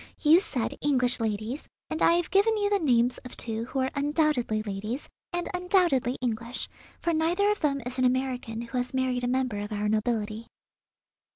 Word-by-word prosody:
You 315 +3 +7
said 260 - -2
English 255 -4 +2
ladies, 220 +5 -3 0.2
and 315 - -4
I - - +6
have 345 -1 0
given 430 +3 +4
you 410 -1 0
the 405 - +3
names 245 -6 +2
of 250 - -7
two 225 0 -3
who 265 - -6
are 260 - 0
undoubtedly 285 -7 +1
ladies, 210 +6 -4 0.2
and 350 -1 -2
undoubtedly 355 - +2
English, 235 0 -1 0.3
for 340 - 0
neither 345 +6 +2
of 420 - -1
them 275 -3 0
is 255 +1 -5
an 255 - +3
American 250 -3 -1
who 240 +2 -3
has 250 +1 -3
married 255 -1 0
a - - +1
member 255 -4 0
of 205 +1 -5
our 210 0 -1
nobility." 215 0 -1
255 Hz, 185 wpm, -27 LUFS, 230-315 Hz, 0.3 s, You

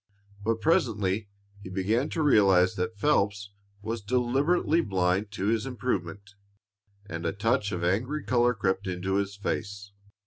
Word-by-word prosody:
But 115 +1 0
presently 110 - +1 0.3
he 95 - -9
began 105 +8 0
to 160 - -1
realize 95 -8 +5
that 100 +3 -3
Phelps 100 -5 +1 0.3
was 115 +1 -3
deliberately 135 - +1
blind 95 - 0
to 100 - -3
his 115 +3 0
improvement, 105 -6 -4 0.7
and 85 -4 -6
a 85 - 0
touch 105 +1 0
of 90 -3 -3
angry 125 +12 0
color 125 0 +2
crept 95 -1 -1
into 95 +1 -1
his 100 0 -2
face. 100 0 -4
105 Hz, 140 wpm, -27 LUFS, 95-120 Hz, 0.7 s, realize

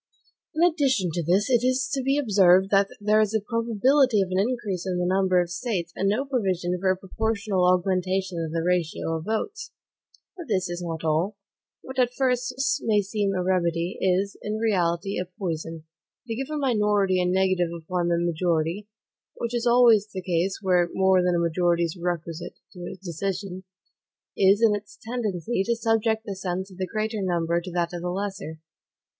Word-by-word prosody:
In 320 - +2
addition 265 - +1
to 175 - -1
this, 180 +6 +2
it 245 -3 +2
is 255 +1 +1
to 275 - 0
be 270 +2 +1
observed 195 -7 +4
that 200 0 +4
there 210 +1 +3
is 215 0 0
a - - +3
probability 230 +3 +2
of 185 - -6
an 185 - +1
increase 200 -5 -2
in 180 -1 -1
the 180 - 0
number 185 0 +2
of 175 -1 -1
States, 175 -4 -3
and 195 - +1
no 235 +7 0
provision 190 -9 -1
for 190 +1 +1
a 185 - +2
proportional 200 -1 -1
augmentation 185 -1 0
of 160 - -4
the 165 0 -1
ratio 170 -2 0
of 160 - -8
votes. 420 - -3 0.7
But 345 -3 -9
this 190 -5 0
is 175 0 -4
not 165 -2 -5
all: 165 +6 0 0.5
what 260 0 -6
at 250 0 +2
first 250 -1 0
sight 285 +2 0
may 210 -2 +4
seem 200 -1 -1
a 180 - 0
remedy, 170 -1 0
is, 190 +2 +1
in 210 +1 -3
reality, 195 -4 0
a 180 - -2
poison. 165 -4 -4 0.4
To 230 - -4
give 265 +5 -4
a 305 - -3
minority 210 -8 +2
a - - +1
negative 185 -1 +2
upon 170 +1 -3
the 170 0 +2
majority 170 +2 -1 0.5
(which 235 0 -4
is 240 0 0
always 235 -4 +5
the 190 -3 -7
case 180 +1 0
where 180 -2 +3
more 190 -1 +4
than 180 -1 +1
a - - +2
majority 170 0 +1
is 165 0 -2
requisite 170 -1 -4 0.2
to 175 -2 -7
a - - -8
decision), 190 +1 -5 0.7
is, 200 +3 +4
in 220 -2 +5
its 205 0 -6
tendency, 225 -3 -2
to 235 +4 0
subject 225 -1 +1
the 200 - -4
sense 190 0 -4
of 185 - -14
the 185 - -1
greater 215 0 -2
number 170 -2 0
to 180 - -8
that 175 0 -1
of 175 - -5
the 180 - -3
lesser. 190 -4 -4
190 Hz, 190 wpm, -25 LUFS, 175-220 Hz, 0.7 s, always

